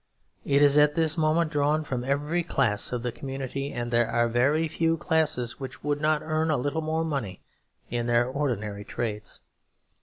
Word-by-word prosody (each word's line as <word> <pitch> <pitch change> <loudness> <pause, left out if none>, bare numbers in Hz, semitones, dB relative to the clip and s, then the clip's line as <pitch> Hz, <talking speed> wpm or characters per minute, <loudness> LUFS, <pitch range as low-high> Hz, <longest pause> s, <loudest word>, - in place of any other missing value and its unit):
It 140 0 +3
is 145 +1 +5
at 150 0 +4
this 160 -1 +2
moment 160 0 +1
drawn 150 +1 +1
from 125 -4 -3
every 145 +6 0
class 130 -10 0
of 120 -2 -3
the 125 - -1
community, 135 +1 -5
and 120 0 -4
there 120 -1 +3
are 120 0 +2
very 140 +7 +2
few 165 +1 0
classes 155 -8 +1
which 130 -2 -8
would 145 0 -1
not 155 0 +2
earn 160 +1 0
a 155 - +2
little 145 +5 -1
more 160 +1 -1
money 130 - -4 0.5
in 120 0 -1
their 120 0 +3
ordinary 120 -7 -3
trades. 105 -1 -5
140 Hz, 180 wpm, -26 LUFS, 120-155 Hz, 0.5 s, is